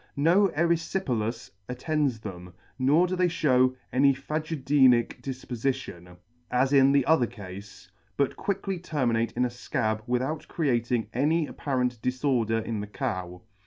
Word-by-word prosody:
No 170 +8 +4
eryfipelas 160 - -1 0.2
attends 135 -2 -1
them, 90 -4 -9 0.2
nor 145 +7 +4
do 185 +1 -2
they 180 0 +2
fhew 130 -6 +2 0.2
any 140 +1 +4
phagedenic 140 -4 +2
difpofition, 125 -9 -4 0.3
as 130 +3 +1
in 135 -1 +6
the 140 -2 +3
other 160 -7 +3
cafe, 100 -5 -9 0.6
but 140 -1 +1
quickly 195 -2 -3
terminate 120 -9 0
in 125 +1 +1
a - - -1
fcab 120 -3 -2
with 125 +1 +1
out 155 +3 -4
creating 120 -6 0
any 155 +6 +2
apparent 125 -5 -2
diforder 125 -3 0
in 110 -2 -3
the 105 - -5
Cow. 95 -7 -4
130 Hz, 135 wpm, -27 LUFS, 115-150 Hz, 0.6 s, in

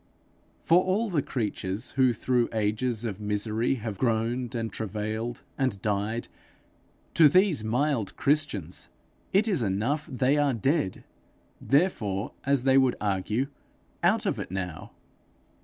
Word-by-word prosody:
For 175 +2 +5
all 200 +4 0
the 155 -5 +2
creatures 105 -5 -3
who 130 -1 +3
through 120 +1 +1
ages 110 +2 0
of 105 -2 -4
misery 105 +4 0
have 110 -4 -5
groaned 120 +1 0
and 115 -3 -3
travailed 110 +3 -4 0.2
and 130 -7 0
died, 105 +3 -1 0.9
to 155 -3 +7
these 180 - +3
mild 120 -1 0
Christians 140 - 0 0.4
it 205 +4 +3
is 185 - +1
enough 115 - -1
that 135 -5 -7
they 130 +4 +3
are 145 -3 +2
dead, 135 - 0 0.6
therefore, 115 - +1 0.2
as 140 -2 +3
they 135 0 +5
would 130 -2 +3
argue, 105 +5 0 0.6
out - - +2
of - - 0
it - - -5
now! 90 -3 -5
120 Hz, 135 wpm, -27 LUFS, 105-140 Hz, 0.9 s, to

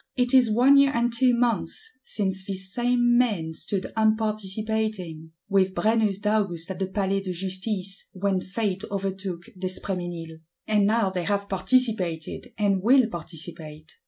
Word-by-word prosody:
It 250 -1 +1
is 255 -3 +6
one 250 +6 +6
year 275 0 +6
and 235 0 +1
two 245 +1 +4
months 245 - -1
since 190 -6 -2
these 190 -1 -4
same 240 0 +3
men 190 -10 0
stood 195 +4 -4
unparticipating, 215 -5 -1 0.2
with 190 -2 +2
Brennus 215 -3 +2
d'Agoust 200 -5 0
at 190 - -6
the 190 - 0
Palais 195 0 0
de 190 -1 -4
Justice, 190 +2 -3
when 190 0 0
Fate 195 0 -2
overtook 190 -2 -3
d'Espréménil; 175 -3 -4 0.3
and 210 -2 +3
now 220 -3 +2
they 180 -2 -3
have 200 +1 0
participated; 190 -4 0
and 200 -2 +2
will 255 +4 +5
participate. 160 -3 -8
200 Hz, 140 wpm, -25 LUFS, 185-225 Hz, 0.3 s, is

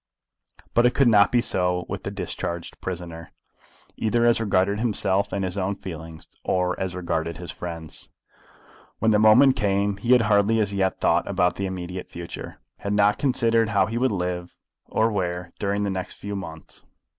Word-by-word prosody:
But 120 +1 +5
it 125 - -1
could 140 - +4
not 105 -3 +5
be 120 - +3
so 90 -4 0
with - - -5
this - - -4
discharged 85 -1 -5
prisoner, 85 -2 -6 0.7
either 115 +2 +1
as 120 -1 +4
regarded 100 -1 +1
himself 100 -4 0
and 100 -1 -1
his 90 +2 -3
own 95 +2 -1
feelings, 80 -3 -9 0.2
or 90 -1 +1
as 95 -1 -3
regarded 85 -2 -2
his 90 -1 -7
friends. 85 -2 -7 0.9
When 110 - +2
the 105 - +4
moment 125 +5 +6
came 100 0 0
he 120 +5 +2
had 125 - +6
hardly 105 +1 +3
as 100 -2 0
yet 95 -1 0
thought - - +2
about 90 0 +1
the 100 - -2
immediate 90 0 -6
future, 85 0 -8 0.2
had 100 +1 -2
not 105 0 +3
considered 115 -4 +2
how 105 -3 +3
he 115 +2 -3
would 130 -1 +2
live, 90 -2 -3 0.3
or 110 +1 +1
where, 90 -3 -3
during 100 +1 0
the 100 - -1
next 95 -1 -4
few 100 0 -6
months. 80 -5 -9
100 Hz, 180 wpm, -24 LUFS, 90-110 Hz, 0.9 s, moment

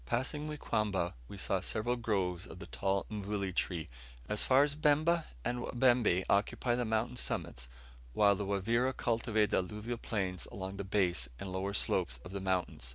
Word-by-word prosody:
Passing 145 - -1
Muikamba, 105 - 0
we 100 - -9
saw 95 0 +1
several 110 +6 -1
groves 95 -6 -1
of 80 - -10
the 95 - -8
tall 95 0 0
mvule 100 -2 -2
tree. 85 -3 -1 0.4
As 105 0 0
far 135 +2 +5
as 145 -1 +1
Bemba 155 +3 +3 0.2
the - - +1
Wabembe 120 -6 +3
occupy 105 +4 +2
the 120 0 0
mountain 110 +3 0
summits, - - -3 0.4
while 100 +3 +5
the 100 +1 -3
Wavira 115 +6 +1
cultivate 115 -2 +1
the - - +3
alluvial 105 +6 -3
plains 95 -6 -2
along 95 0 -5
the 100 - -3
base 90 -10 +1
and 95 - -5
lower 95 +2 -2
slopes 60 -9 0
of 90 - -8
the 100 0 -4
mountain. 95 -6 -1
105 Hz, 170 wpm, -33 LUFS, 95-120 Hz, 0.4 s, far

